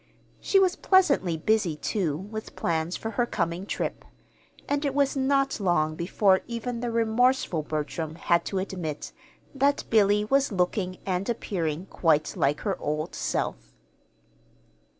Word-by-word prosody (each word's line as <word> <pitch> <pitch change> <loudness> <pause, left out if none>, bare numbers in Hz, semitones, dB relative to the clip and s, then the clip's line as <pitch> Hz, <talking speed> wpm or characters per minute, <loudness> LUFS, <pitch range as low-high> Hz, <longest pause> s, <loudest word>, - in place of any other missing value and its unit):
She 395 - +2
was 370 -1 +3
pleasantly 280 - +3
busy, 190 -1 +1
too, 155 -1 -1
with 215 +5 -7
plans 165 +1 -1
for 225 - -5
her 240 +3 0
coming 175 -1 -2
trip; - - -3 0.6
and 285 +1 0
it 280 -2 -1
was 280 -1 +2
not 275 -1 +1
long 175 -5 +1
before 190 +4 +2
even 235 0 -4
the 240 0 -2
remorseful 230 -4 +2
Bertram 155 +1 -4
had 170 0 +2
to 195 - -3
admit 180 -6 -4 0.4
that 280 +1 +2
Billy 210 -1 +4
was 275 +3 +2
looking 185 0 -1
and 190 +3 -1
appearing 175 -7 -2
quite 160 -5 +1
like 145 +2 +1
her 200 -3 -2
old 155 +2 -3
self. - - -3
195 Hz, 140 wpm, -26 LUFS, 165-240 Hz, 0.6 s, Billy